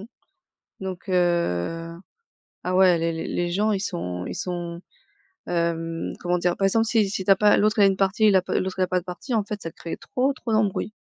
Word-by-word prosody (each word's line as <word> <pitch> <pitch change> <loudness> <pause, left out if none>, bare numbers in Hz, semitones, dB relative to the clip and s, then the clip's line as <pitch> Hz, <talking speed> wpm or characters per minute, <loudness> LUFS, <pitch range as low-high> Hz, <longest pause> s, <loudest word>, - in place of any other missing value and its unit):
mmh, 205 - -9 0.7
donc 190 0 -6
heu, 165 - 0 0.7
ah 180 0 -1
ouais! 185 -2 +5
Les 165 0 0
les 160 - -4
les 175 0 -1
gens 210 +4 +1
ils 200 - 0
sont 90 - -4
ils - - -5
sont, 175 -1 -4 0.7
hem, 165 -1 -2
comment 175 0 0
dire? 175 0 0
Par 195 - +1
exemple, 225 +4 +3
si 220 -2 +2
si 190 -1 -3
tu 195 - +4
as - - +8
pas, 210 +1 +4
l'autre, 215 +1 +2
il - - +7
a - - +8
une 195 -1 +1
partie, 200 +2 +3
la 190 - +4
p 185 - -1
l'autre, 190 0 -4
il - - +4
a - - 0
pas 185 0 +1
de 175 - -15
partie, 180 +8 -4
en 215 - +2
fait, 210 0 -6
ça 165 - -6
crée 165 - -7
trop, 265 +2 -1
trop 245 -3 -6
d'embrouilles. 215 -1 0
185 Hz, 235 wpm, -24 LUFS, 170-205 Hz, 0.7 s, as